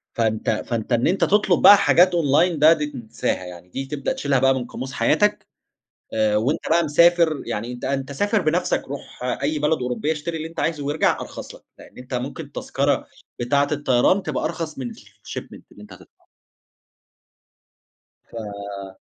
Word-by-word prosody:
فأنت 110 -2 0 0.2
فأنت 115 0 -3
إن 120 - +2
أنت 190 +3 +1
تطلُب 195 -3 +3
بقى 205 - +9
حاجات 185 -2 +5
online 165 +2 +2
ده، 155 +2 +7
دي 150 -2 -2
تنساها، 120 -9 -4
يعني 90 0 -11
دي 135 +8 -5
تبدأ 140 0 -3
تشيلها 140 -2 0
بقى 135 +1 +4
من 130 -2 -3
قاموس 130 +2 -7
حياتك 210 +8 +1 0.7
آآ 110 -1 +2
وأنت 125 +8 0
بقى 170 +1 +4
مسافر 165 0 +3
يعني، 115 +4 -4
أنت 120 - -8
أنت 135 +1 -2
سافر 205 - +1
بنفْسك، 170 +3 0
رُوح 140 -2 -9 0.2
أي 155 0 0
بلد 150 +2 +1
أوروبية، 125 +5 -1
اشتري 160 +2 -4
اللي 160 +1 -5
أنت 165 - -6
عايزه 150 -3 -1
وأرجَع 145 +2 +1
أرخص - - -8
لك، - - -15 0.2
لأن - - -15
أنت 125 +1 -8
ممكن 125 +3 -4
التذكرة - - -1 0.3
بتاعة 140 +4 +2
الطيران 145 +6 +2
تبقى 145 -7 -3
أرخص 160 -2 -4
من 125 -3 -5
الshipment - - -10
اللي - - -14
أنت - - -13
هتدفعه. - - -18 2.1
ف 100 -3 -7
140 Hz, 165 wpm, -22 LUFS, 120-160 Hz, 2.1 s, بقى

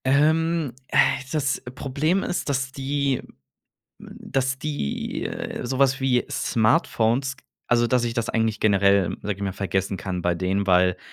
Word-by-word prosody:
Ähm, 155 +1 +2
äh, - - -1 0.3
das 140 -3 0
Problem 150 +8 0
ist, 175 - -2
dass 135 -1 -1
die 140 0 -1
hm - - -18 0.6
dass 130 -1 -3
die, 145 - -3
äh, - - -5
so 130 +2 -3
was 135 0 +3
wie 125 -2 +2
Smartphones 115 +3 +1 0.3
also 120 0 +3
dass 125 0 +2
ich 120 -1 -1
das 115 -1 -1
eigentlich 110 -1 0
generell, 100 -3 +3
sage 105 -1 -2
ich - - -11
mal, 100 -2 -2
vergessen 95 0 -1
kann 90 -1 -4
bei 90 0 +1
denen, 95 +3 -1
weil, 90 0 +4
125 Hz, 155 wpm, -24 LUFS, 100-135 Hz, 0.6 s, weil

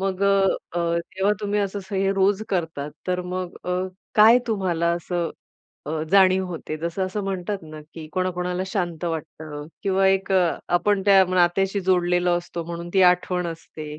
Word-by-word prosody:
मग 190 0 -2
अ, - - +4 0.5
अ, 170 0 +1
तेव्हा 190 +4 -1
तुम्ही 205 0 0
असं 200 0 -2
स - - -12
हे 195 0 +1
रोज 195 +2 +2
करता. 160 -6 -2 0.2
तर 180 0 0
मग 185 -1 -4
अ, 180 - -3 0.4
काय 220 +3 +7
तुम्हाला 180 -6 0
असं 175 0 -3 0.6
अ, 155 +1 -2
जाणीव 190 -1 +5
होते 160 -3 -5
जसं 170 +4 -2
असं 205 +2 -4
म्हणतात 195 +1 -3
ना, 155 -1 -10
की 160 -2 -8
कोणाकोणाला 180 0 -1
शांत 175 -4 -3
वाटतं 155 -2 -5 0.2
किंवा 195 -1 +2
एक 195 0 +1
आपण 185 +2 +1
त्या 195 -1 +7
नात्याशी 195 +3 +2
जोडलेलो 180 -1 +2
असतो 175 -1 -6
म्हणून 170 +1 -6
ती 190 - +5
आठवण 180 0 -2
असते. 155 -2 -8
180 Hz, 165 wpm, -23 LUFS, 170-195 Hz, 0.6 s, काय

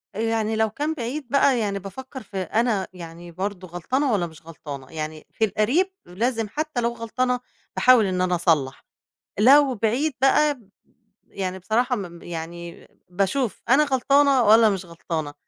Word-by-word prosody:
آآ، - - -5
يعني 225 -1 0
لو 220 0 +2
كان 295 +8 -2
بعيد 270 +1 -5
بقى 275 -2 +3
يعني 200 -2 -1
بافكّر 260 +6 -9
في 195 - -9
أنا 215 -1 0
يعني 170 0 -10
برضه 190 +1 -5
غلطانة 255 - -1
والّا 180 -5 +1
مش 160 -1 -15
غلطانة، 140 -5 -9
يعني 155 -1 -6
في 220 - +1
القريب 265 - +1
لازم 225 +4 -1
حتّى 305 -3 -3
لو 235 0 0
غلطانة 250 +2 -1 0.4
باحاول 250 -4 +5
إن 185 -1 -1
أنا 180 -1 +1
أصلّح، 155 -6 0 0.5
لو 270 +3 +6
بعيد 240 +8 0
بقى 290 +2 +4
ب 220 -6 -22 0.6
يعني 190 -1 -3
بصراحة 240 +6 0
ما 195 -4 -5
م 170 0 -14
يعني 170 0 -8 0.2
باشوف 200 +6 -1
أنا 280 +4 +5
غلطانة 275 0 +3
والّا 220 0 +6
مش 190 -2 -3
غلطانة، 160 -3 -5
220 Hz, 165 wpm, -23 LUFS, 180-255 Hz, 0.6 s, لو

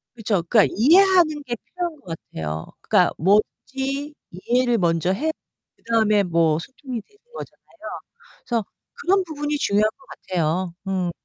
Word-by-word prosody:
그렇죠. 210 -6 0
그러니까 215 +1 +4
이해하는 330 - +5
게 240 -3 -3
필요한 345 +4 -6
것 165 -4 -6 0.2
같아요. 80 0 -4 0.2
그러니까 - - +3
뭐든지 265 - 0 0.2
이해를 240 +6 +1
먼저 170 -1 +1
해 310 +11 0 0.5
그다음에 215 -3 +2
뭐 165 -3 +2
소통이 255 - -7
되는 415 - -30
거잖아요. 320 -8 -10 0.6
그래서 230 -4 -1 0.3
그런 390 -4 +1
부분이 295 -2 -3
중요한 210 -3 +2
것 270 - -21
같아요. 175 0 -2
음. 185 -2 -1
230 Hz, 330 characters per minute, -23 LUFS, 185-295 Hz, 0.6 s, 이해하는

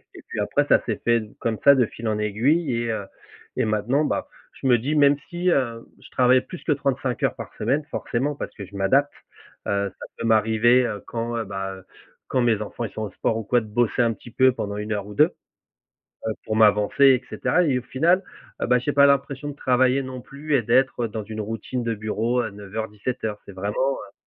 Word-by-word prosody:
et - - -11
puis - - -5
après - - +1
ça - - +6
s'est - - -3
fait 115 -1 +3 0.2
comme 115 -2 -1
ça 140 - +9
de 125 -3 +3
fil 115 - -7
en 105 -1 0
aiguille 125 +8 +1
et 115 - -1
heu 105 -3 -3 0.5
et 130 - +2
maintenant, 110 +8 +1
bah, - - -2 0.3
je - - -4
me 125 -2 +5
dis: 135 +7 -2
«Même 145 -1 +5
si, 180 0 0
heu, 115 -6 0 0.2
je - - -14
travaille 125 0 +4
plus 180 - -10
que - - 0
35 135 -3 -2
heures - - +1
par - - -9
semaine», 150 +3 0
forcément, 140 +5 -2
parce - - -6
que 100 - -7
je 100 +2 -15
m'adapte, 135 +9 +2 0.5
heu, 100 0 0
ça - - -7
peut - - -4
m'arriver, 115 +3 +4
heu, 105 -3 -4
quand, 115 0 -3
heu, 115 - -1
bah 95 -1 -4
heu, 95 - -13 0.4
quand 130 - +1
mes 115 -3 +2
enfants, 105 +2 -5
ils 105 - -7
sont 110 - -4
au 105 - -5
sport 110 - -1
ou 115 - -4
quoi 120 +4 +2
de 110 - -10
bosser 120 +3 +1
un 115 -1 +1
petit 120 - -14
peu 130 +2 +4
pendant 100 -4 -4
1 105 +1 -4
heure 100 -1 -3
ou 105 - -8
2, - - +5 1.0
heu, - - 0
pour 110 - -2
m'avancer 105 +4 +4
et 130 -2 +5
cetera 180 - +1
et 135 -6 +2
au - - -14
final, 170 +10 +2 0.4
heu - - +2
bah, 125 - +4
j'ai 130 +4 -2
pas 140 0 +6
l'impression 140 0 +1
de - - -8
travailler 130 0 +2
non 130 -1 -7
plus 145 +4 -4
et 120 - +1
d'être, 125 +2 +2
heu, - - -1
dans 110 -1 -5
une 110 +1 -6
routine 115 +4 -4
de 115 -1 -1
bureau, 110 +3 -1
heu, 110 - -4
09:00-17:00. 105 +2 -5
C'est 100 - -10
vraiment, 105 +8 -1
heu 100 - -10
120 Hz, 230 wpm, -24 LUFS, 105-135 Hz, 1.0 s, ça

